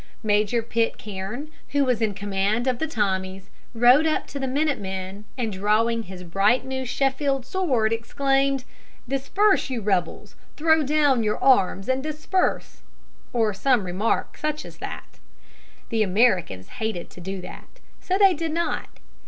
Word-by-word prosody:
Major 215 +2 +2
Pitcairn, 225 +3 -3 0.2
who 285 -1 +3
was 250 -3 0
in 210 -3 0
command 205 +3 0
of 255 -2 0
the 320 - -1
Tommies, 190 -6 -2 0.2
rode 250 +7 +6
up 310 - 0
to 280 - -5
the 265 - -2
minute 280 0 0
men, 190 +1 -6
and, 225 -4 -2
drawing 215 +4 +1
his 185 -3 -9
bright 195 +9 +2
new 260 0 -3
Sheffield 270 +1 0
sword, 260 -11 +1
exclaimed, 270 +3 0 0.4
"Disperse, 280 - +2
you 255 -3 -2
rebels! 190 -5 -2 0.2
throw 315 0 +4
down 290 -3 +3
your 210 -1 0
arms 205 -7 +3
and 260 0 +1
disperse!" 310 +5 -1 0.5
or 225 -4 +1
some 245 +4 +2
such - - -7
remark 185 +5 -1
as 295 - -3
that. - - -8 0.7
The 225 -1 0
Americans 185 - +2
hated 220 -6 -3
to 180 - -12
do 190 +2 -5
that, 180 - -12 0.2
so 375 0 0
they 390 -2 +6
did 325 -1 -3
not. 340 +1 -3
230 Hz, 150 wpm, -24 LUFS, 200-275 Hz, 0.7 s, rode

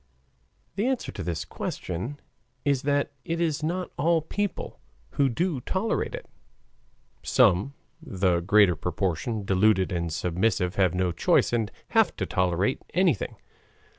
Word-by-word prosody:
The 210 +5 +1
answer 260 -2 -1
to - - -7
this 85 0 -3
question 105 +12 -5 0.5
is 140 -3 +2
that 145 0 0
it 165 0 -2
is 160 -3 0
not 175 +4 -2
all 165 +1 +3
people 205 +5 -3 0.3
who 140 -1 +2
do 165 +3 -1
tolerate 205 - -1
it - - -9 0.9
(some 115 +2 +3 0.3
the 95 - +1
greater 100 0 +4
proportion 95 +5 -2
deluded 95 0 +3
and 85 -2 -2
submissive, 90 +2 0
have 90 -3 +2
no 90 -1 +1
choice 85 - +2
and 115 -3 0 0.2
have - - +3
to - - -2
tolerate 90 +6 0
anything). 175 - +2
110 Hz, 135 wpm, -26 LUFS, -, 0.9 s, greater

